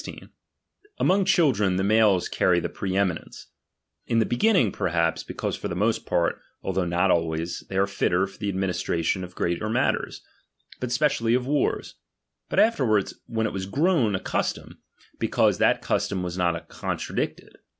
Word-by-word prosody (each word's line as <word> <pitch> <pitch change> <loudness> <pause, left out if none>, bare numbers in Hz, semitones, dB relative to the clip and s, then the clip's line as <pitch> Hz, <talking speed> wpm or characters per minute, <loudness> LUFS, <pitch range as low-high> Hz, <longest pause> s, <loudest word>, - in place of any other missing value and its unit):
Among 190 +1 +3
children 105 - +3
the 95 - 0
males 105 -3 +3
carry 90 -1 +2
the - - -3
pre 95 -1 -3
eminence; 95 -4 -2 0.6
in 115 - +1
the 110 - +4
beginning 180 - +3
perhaps, 85 -4 0
because - - -4
for - - -5
the 85 - -4
most 105 +5 0
part, 85 - 0 0.2
although 95 -1 -1
not 90 +2 +2
always, 80 0 -1
they 95 - -3
are 100 - +4
fitter 95 -2 +1
for 95 0 -13
the 105 - -2
administration 95 -1 -1
of 90 0 -9
greater 85 +5 -1
matters, 125 +4 -1 0.6
but 125 -1 -3
spe 125 - 0
cially 115 -5 +2
of 125 0 0
wars; 145 +1 0 0.6
but - - -3
afterwards, 125 - +2
when 110 -1 -1
it 110 - -2
was 95 -1 -4
grown 140 - +2
a - - -1
custom, - - -3 0.4
because - - +2
that - - +3
custom 95 -2 -1
was 90 -1 -4
not 85 -2 -1
contra - - -5
dicted. - - -4
100 Hz, 165 wpm, -25 LUFS, 90-115 Hz, 0.6 s, the